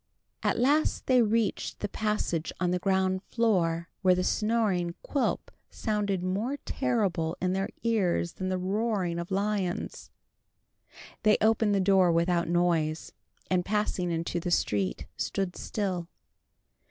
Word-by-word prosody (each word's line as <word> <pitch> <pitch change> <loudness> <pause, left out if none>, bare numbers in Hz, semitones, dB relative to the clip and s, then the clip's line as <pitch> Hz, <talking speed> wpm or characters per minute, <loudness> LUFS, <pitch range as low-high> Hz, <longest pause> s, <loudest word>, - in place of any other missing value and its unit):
At - - +1
last 285 +6 +2
they 255 -2 +5
reached 225 -2 0
the 205 - -2
passage 210 -6 -1
on 180 -1 +1
the 180 - 0
ground 190 0 +1
floor, 175 -8 +1
where 185 -2 +5
the 180 - 0
snoring 210 -5 +1
of 170 - -11
Quilp 280 - -1 0.2
sounded 205 -4 -1
more 210 +10 -1
terrible 200 -11 0
in 185 0 0
their 195 +1 -1
ears 190 -7 +1
than 185 0 -3
the 185 - 0
roaring 190 -2 -1
of 170 - -5
lions. 195 -2 -2 1.1
They 215 -1 +4
opened 220 -1 +3
the - - +2
door 190 -2 +4
without 170 +1 +2
noise, 170 -3 +1 0.4
and 185 -1 +1
passing 200 -3 -1
into 170 +1 -1
the 175 - -3
street, 100 - 0
stood 190 -3 -2
still. 185 -5 -3
190 Hz, 140 wpm, -28 LUFS, 175-215 Hz, 1.1 s, they